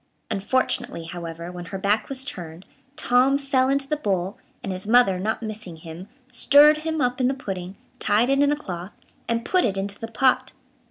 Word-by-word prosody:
Unfortunately, 245 -3 -1
however, 170 0 -7
when 175 -1 -8
her 195 +1 -5
back 205 +3 0
was 265 -1 -3
turned, 175 -4 -6 0.3
Tom 265 -2 +3
fell 270 -2 +1
into 275 0 0
the 300 - 0
bowl, 195 -7 -1 0.3
and 195 - -3
his 185 +2 -5
mother, 220 -5 +4
not 220 +4 -2
missing 215 -5 -6
him, 165 +3 -10 0.2
stirred 290 +4 +6
him 315 0 -2
up 250 +1 0
in 250 - +3
the 265 - 0
pudding, 190 -6 -6 0.2
tied 220 +5 +2
it 275 - +3
in 285 0 +4
a - - +2
cloth, 180 -9 -7 0.3
and 230 0 -1
put 365 -1 +2
it 195 -4 0
into 200 +1 -3
the 225 - -5
pot. 255 +3 +1
220 Hz, 195 wpm, -24 LUFS, 185-265 Hz, 0.3 s, stirred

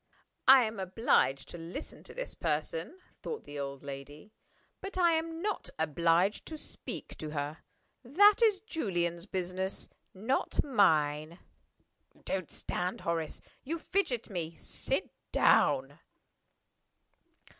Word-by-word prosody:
"I 265 -1 +9
am 220 -2 -3
obliged 185 - +2
to 175 - -7
listen 170 - -5
to - - -8
this - - -3
person," 160 - -2 0.2
thought 460 - -5
the 145 0 -7
old 140 0 -5
lady. 145 +7 -9 0.5
"But 390 -1 -5
I 345 -2 +5
am 325 +1 -2
not 420 -1 -1
obliged 165 +5 +2
to 315 - -5
speak - - -5
to 155 - -4
her. 150 +1 -3 0.4
That 400 - +6
is 415 -4 +4
Julian's 175 - -2
business 185 0 -2 0.2
not 225 +8 0
mine. 160 - +2 0.9
Don't 185 -4 -2
stand, 180 +1 -2
Horace! 165 -2 -2 0.2
You 325 +5 -2
fidget 320 - 0
me. 170 -3 -3
Sit - - -2 0.2
down." - - +3
185 Hz, 120 wpm, -31 LUFS, -, 0.9 s, I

